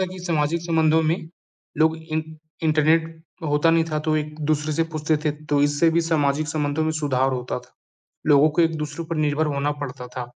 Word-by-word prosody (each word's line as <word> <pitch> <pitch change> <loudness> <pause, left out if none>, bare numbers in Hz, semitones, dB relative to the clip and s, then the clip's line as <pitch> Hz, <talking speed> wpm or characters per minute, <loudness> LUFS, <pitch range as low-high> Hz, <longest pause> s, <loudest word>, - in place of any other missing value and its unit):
था 190 - +2
कि 185 0 -9
सामाजिक 165 -1 0
संबंधों 160 -1 +3
में 160 +1 -1 0.5
लोग 160 +1 +3
इं 160 -1 -3 0.4
इंटरनेट 160 +1 +2 0.2
होता 150 +2 +3
नहीं 165 0 +3
था, 155 - 0
तो 155 0 0
एक-दूसरे 150 0 -1
से 165 - +1
पूछते 155 0 0
थे, 150 - +2
तो 150 -1 -1
इससे 145 +3 +3
भी 170 - +2
सामाजिक 155 -2 0
संबंधों 150 0 -1
में 160 - +1
सुधार 135 -4 0
होता 125 -1 -3
था। - - -19 0.5
लोगों 150 +1 +6
को 170 - +6
एक-दूसरे 160 0 -1
पर 165 - -2
निर्भर 155 0 +1
होना 145 +1 0
पड़ता 125 -2 -6
था, 125 0 -6
155 Hz, 190 wpm, -23 LUFS, 145-160 Hz, 0.5 s, लोगों